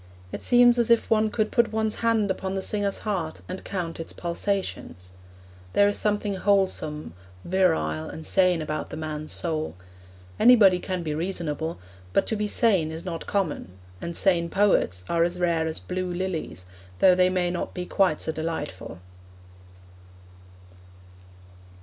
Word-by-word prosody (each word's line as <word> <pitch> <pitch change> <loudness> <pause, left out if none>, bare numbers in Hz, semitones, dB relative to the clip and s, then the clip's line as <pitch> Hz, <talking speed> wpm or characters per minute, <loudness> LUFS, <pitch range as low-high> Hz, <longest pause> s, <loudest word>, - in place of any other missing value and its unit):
It - - -6
seems 245 0 +5
as 235 - +1
if 235 0 +3
one 220 0 +3
could 215 0 -1
put 235 -1 +2
one's 220 -1 -1
hand 225 -3 +2
upon 190 0 -3
the 190 - -2
singer's 205 -1 -1
heart 180 -7 -3
and 185 +1 -6
count 175 -4 -4
its 165 - -6
pulsations. 170 - -4 0.6
There 205 - +5
is 205 - 0
something 205 -1 0
wholesome, 185 - 0 0.3
virile 80 - +1
and 160 - -8
sane 180 -4 +2
about 155 0 -4
the - - -7
man's 155 -1 -4
soul. 155 - -1 0.6
Anybody 205 -7 +6
can 185 -1 -4
be 155 -2 -2
reasonable, 160 -1 -3 0.4
but - - +3
to 220 - +1
be 210 0 -1
sane 195 -8 +2
is 160 +2 -7
not 165 -3 -5
common; 180 - -2 0.3
and 170 0 -3
sane 170 -4 +3
poets 160 - +2
are 170 - +1
as 175 +1 -1
rare 165 -2 +1
as 160 - -4
blue 185 0 -4
lilies, 175 - -4 0.3
though 185 - +6
they 180 0 +4
may 180 -1 0
not 175 - -4
be 180 -1 -4
quite 185 -4 +1
so 160 - -2
delightful. 155 - -5
180 Hz, 155 wpm, -25 LUFS, 160-200 Hz, 0.6 s, Anybody